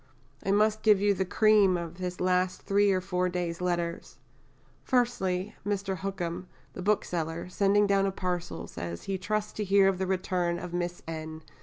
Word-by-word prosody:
I -, -, -3 dB
must 215 Hz, +2 st, +3 dB
give 210 Hz, -3 st, +5 dB
you 205 Hz, 0 st, +3 dB
the 190 Hz, 0 st, -1 dB
cream 205 Hz, -1 st, +4 dB
of 170 Hz, +1 st, -7 dB
this 180 Hz, -1 st, -4 dB
last 180 Hz, 0 st, +1 dB
three 200 Hz, 0 st, +3 dB
or 185 Hz, -1 st, +1 dB
four 180 Hz, -1 st, 0 dB
days' 175 Hz, -1 st, -3 dB
letters. 175 Hz, -1 st, -2 dB, 0.7 s
Firstly, 215 Hz, -6 st, 0 dB
Mr. 200 Hz, -2 st, -2 dB
Hookham, 180 Hz, -2 st, -4 dB, 0.3 s
the -, -, -7 dB
bookseller, 170 Hz, -5 st, -1 dB
sending 200 Hz, +2 st, +3 dB
down 195 Hz, -1 st, +2 dB
a -, -, 0 dB
parcel, 180 Hz, -2 st, -3 dB
says 85 Hz, 0 st, -6 dB
he 195 Hz, -1 st, -3 dB
"trusts 210 Hz, +2 st, -2 dB
to 210 Hz, -, -3 dB
hear 195 Hz, 0 st, +4 dB
of 190 Hz, -1 st, +1 dB
the 190 Hz, -, -1 dB
return 180 Hz, -2 st, 0 dB
of 175 Hz, 0 st, -7 dB
Miss 175 Hz, 0 st, -3 dB
N. 160 Hz, -1 st, -6 dB
185 Hz, 175 wpm, -28 LUFS, 175-200 Hz, 0.7 s, give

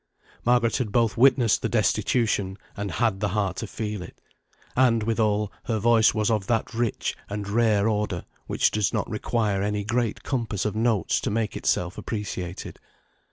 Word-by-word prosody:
Margaret 120 Hz, -1 st, +3 dB
had 120 Hz, -6 st, -2 dB
both 115 Hz, -2 st, +2 dB
witnessed 125 Hz, -2 st, +4 dB
the -, -, -1 dB
destitution, 105 Hz, -5 st, +1 dB, 0.2 s
and 100 Hz, 0 st, -3 dB
had 110 Hz, -4 st, +1 dB
the 105 Hz, -, 0 dB
heart 95 Hz, -1 st, -1 dB
to 115 Hz, -, -4 dB
feel 105 Hz, -1 st, -4 dB
it; 90 Hz, -, -11 dB, 0.6 s
and 120 Hz, -3 st, +3 dB
withal, 105 Hz, -2 st, +1 dB
her 115 Hz, -, 0 dB
voice 115 Hz, +1 st, +4 dB
was 110 Hz, 0 st, 0 dB
of 105 Hz, -4 st, 0 dB
that 115 Hz, +1 st, 0 dB
rich 115 Hz, -1 st, -1 dB
and 100 Hz, 0 st, -4 dB
rare 105 Hz, -1 st, +2 dB
order, 105 Hz, -5 st, -1 dB, 0.2 s
which -, -, +2 dB
does 105 Hz, -3 st, +1 dB
not -, -, -1 dB
require 105 Hz, -4 st, -1 dB
any 105 Hz, 0 st, -1 dB
great 115 Hz, +1 st, -1 dB
compass 115 Hz, -7 st, -2 dB
of 105 Hz, -1 st, -1 dB
notes 110 Hz, -4 st, +1 dB
to -, -, -1 dB
make 110 Hz, -1 st, -1 dB
itself 90 Hz, +1 st, -1 dB
appreciated. 95 Hz, -5 st, -5 dB
110 Hz, 165 wpm, -25 LUFS, 100-115 Hz, 0.6 s, witnessed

